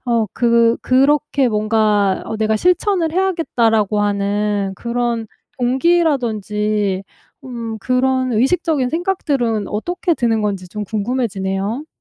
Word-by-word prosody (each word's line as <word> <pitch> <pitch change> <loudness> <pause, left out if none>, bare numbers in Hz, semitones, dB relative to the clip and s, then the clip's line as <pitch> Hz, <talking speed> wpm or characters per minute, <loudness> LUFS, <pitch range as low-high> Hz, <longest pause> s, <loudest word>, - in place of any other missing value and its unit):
어, 230 -2 +1
그 235 -1 +3
그렇게 275 +1 +2
뭔가 210 -2 +1
어 220 - -4
'내가 220 0 +1
실천을 360 - +1
해야겠다.'라고 235 - +1
하는 205 0 0
그런 235 +1 -2 0.3
동기라든지 220 - 0 0.4
음 230 -3 -6
그런 255 +2 0
의식적인 270 +3 +1
생각들은 275 - -1
어떻게 345 +10 -1
드는 225 -5 0
건지 195 -3 -2
좀 210 +2 -5
궁금해지네요. 210 +1 -2
230 Hz, 265 characters per minute, -18 LUFS, 210-265 Hz, 0.4 s, 그